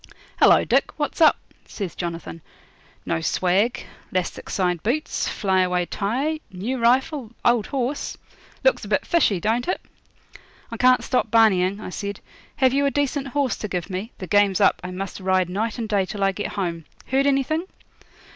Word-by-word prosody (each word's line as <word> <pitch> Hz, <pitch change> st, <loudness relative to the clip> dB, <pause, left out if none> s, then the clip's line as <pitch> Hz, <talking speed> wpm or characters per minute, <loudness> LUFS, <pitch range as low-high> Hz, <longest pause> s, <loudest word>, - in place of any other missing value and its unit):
'Hello, -, -, +6 dB
Dick, -, -, +2 dB
what's 300 Hz, +2 st, -3 dB
up?' 310 Hz, -, +7 dB, 0.3 s
says 195 Hz, -6 st, -5 dB
Jonathan. 170 Hz, -1 st, -6 dB, 0.6 s
'No 80 Hz, -, -1 dB
swag, 190 Hz, -, +1 dB, 0.3 s
'lastic 185 Hz, -1 st, -3 dB
side 180 Hz, -3 st, 0 dB
boots, 270 Hz, -, -1 dB
flyaway 185 Hz, -3 st, +1 dB
tie, 260 Hz, -, -1 dB
new 220 Hz, +8 st, -3 dB
rifle, 255 Hz, +2 st, +2 dB, 0.2 s
old 240 Hz, -3 st, +3 dB
horse; 270 Hz, +1 st, -3 dB, 0.5 s
looks -, -, +3 dB
a -, -, -6 dB
bit -, -, 0 dB
fishy 295 Hz, -, +2 dB
don't 225 Hz, +6 st, 0 dB
it?' 365 Hz, -, 0 dB, 0.9 s
'I 230 Hz, -, -5 dB
can't 255 Hz, +2 st, +4 dB
stop 255 Hz, -, 0 dB
barneying,' 200 Hz, -4 st, +4 dB
I 200 Hz, -, -7 dB
said. 200 Hz, +1 st, -5 dB, 0.4 s
'Have 265 Hz, -3 st, +3 dB
you 280 Hz, +1 st, +2 dB
a -, -, +3 dB
decent 285 Hz, 0 st, -1 dB
horse 275 Hz, -1 st, 0 dB
to 210 Hz, -, -4 dB
give 180 Hz, -1 st, -4 dB
me? 195 Hz, +6 st, -4 dB
The 190 Hz, -, -6 dB
game's 205 Hz, -1 st, +3 dB
up. 200 Hz, -, +3 dB
I 180 Hz, -, -5 dB
must 190 Hz, +2 st, -5 dB
ride 185 Hz, -1 st, +1 dB
night 220 Hz, +5 st, -2 dB
and 230 Hz, -2 st, -3 dB
day 200 Hz, -3 st, +1 dB
till 200 Hz, 0 st, -3 dB
I 195 Hz, -, +3 dB
get 205 Hz, +2 st, -5 dB
home. 170 Hz, -5 st, -3 dB, 0.2 s
Heard 270 Hz, +2 st, +2 dB
anything?' 280 Hz, +5 st, +1 dB
210 Hz, 170 wpm, -23 LUFS, 185-265 Hz, 0.9 s, up